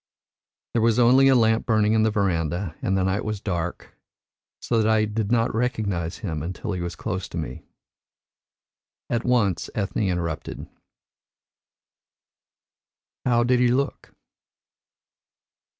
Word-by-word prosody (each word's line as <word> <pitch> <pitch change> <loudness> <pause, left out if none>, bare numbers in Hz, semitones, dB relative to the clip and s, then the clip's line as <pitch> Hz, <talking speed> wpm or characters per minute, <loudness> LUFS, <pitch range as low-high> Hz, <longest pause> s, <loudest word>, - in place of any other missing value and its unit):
There 115 - +2
was 115 0 +3
only 125 +3 +6
a 135 - +5
lamp 110 -2 +2
burning 110 -2 +3
in 110 - +3
the 110 - +3
verandah, 90 -4 -1
and 95 - 0
the 95 - +1
night 95 +2 0
was 105 -1 -3
dark, 90 -4 -4 0.7
so 115 -2 +1
that 110 - +2
I 110 -1 +3
did 105 0 -2
not 115 -1 +2
recognise 105 -8 -1
him 80 -5 -3
until 90 +6 -5
he 90 -3 -3
was 85 -1 -4
close 95 +1 -4
to - - -7
me." 75 -6 -6 1.4
And 120 - +2
at 115 - -4
once 105 -9 +1
Ethne 100 0 -1
interrupted. 85 -3 -3 2.6
"How 120 -1 +3
did 125 +1 +2
he 125 - +4
look?" 135 +3 -1
105 Hz, 135 wpm, -24 LUFS, 90-115 Hz, 2.6 s, only